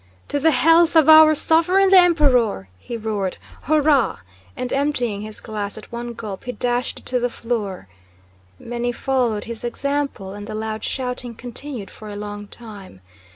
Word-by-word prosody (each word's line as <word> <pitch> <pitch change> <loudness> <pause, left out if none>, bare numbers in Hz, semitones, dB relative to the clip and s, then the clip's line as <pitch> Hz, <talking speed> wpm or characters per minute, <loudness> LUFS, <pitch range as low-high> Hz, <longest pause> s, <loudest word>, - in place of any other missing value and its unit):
"To 285 - 0
the 320 +3 +4
health 330 +1 +4
of 315 -3 +6
our 315 0 +8
Sovereign, 355 +6 +4
the 385 - +8
Emperor!" 260 - +3
he 235 - -6
roared, 210 -4 -3 0.3
"Hurrah!" 295 -3 +3 0.4
and 250 - -3
emptying 250 -7 -1
his 215 0 -6
glass 210 -2 -4
at 215 - -12
one 235 0 -5
gulp 210 -4 -7
he 250 - -4
dashed 245 0 -2
it - - -25
to 250 - 0
the 245 0 0
floor. 220 - -4 0.7
Many 240 +1 -3
followed 240 -4 -1
his 230 -1 -7
example, 275 -5 -3
and 205 0 -8
the 215 - -6
loud 220 0 -4
shouting 250 -2 -3
continued 245 -1 -6
for 215 - -11
a 205 - -7
long 205 0 -7
time. 205 - -11
240 Hz, 165 wpm, -21 LUFS, 215-285 Hz, 0.7 s, our